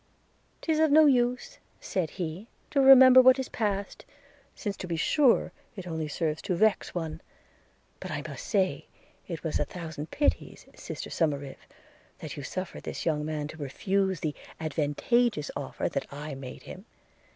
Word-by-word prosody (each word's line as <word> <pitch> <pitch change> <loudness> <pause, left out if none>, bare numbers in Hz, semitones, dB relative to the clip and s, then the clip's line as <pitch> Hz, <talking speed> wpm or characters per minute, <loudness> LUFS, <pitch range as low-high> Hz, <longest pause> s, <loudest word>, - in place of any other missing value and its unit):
''Tis 315 -2 +1
of 315 - +4
no 310 +2 +7
use,' 245 -3 +1 0.2
said 180 -5 -2
he, 175 +4 -5 0.2
'to 280 - +3
remember 260 -1 +9
what 260 +1 +6
is 265 - -4
passed, 200 -3 -3 0.5
since 205 -2 -4
to 185 - -6
be 170 - -2
sure 270 - +3 0.2
it 190 -4 -7
only 160 -3 -3
serves 155 0 -2
to 185 - -1
vex 215 0 +1
one; 160 -2 -4 0.8
but - - -7
I - - -4
must - - -8
say, 190 -3 0 0.4
it 165 -3 -6
was 160 - -1
a - - +2
thousand 160 -2 -7
pities, 290 - -1
sister - - -7
Somerive, 140 -4 -2 0.5
that - - -7
you - - -6
suffered 185 +6 -5
this - - -6
young 150 -2 0
man 150 -1 -3
to 160 - -10
refuse 190 +6 -1
the 155 -2 -1 0.3
advantageous 155 - 0
offer - - -3
that - - -4
I 145 +1 -6
made 135 -1 -9
him. 190 +3 -10
180 Hz, 160 wpm, -28 LUFS, 155-235 Hz, 0.8 s, remember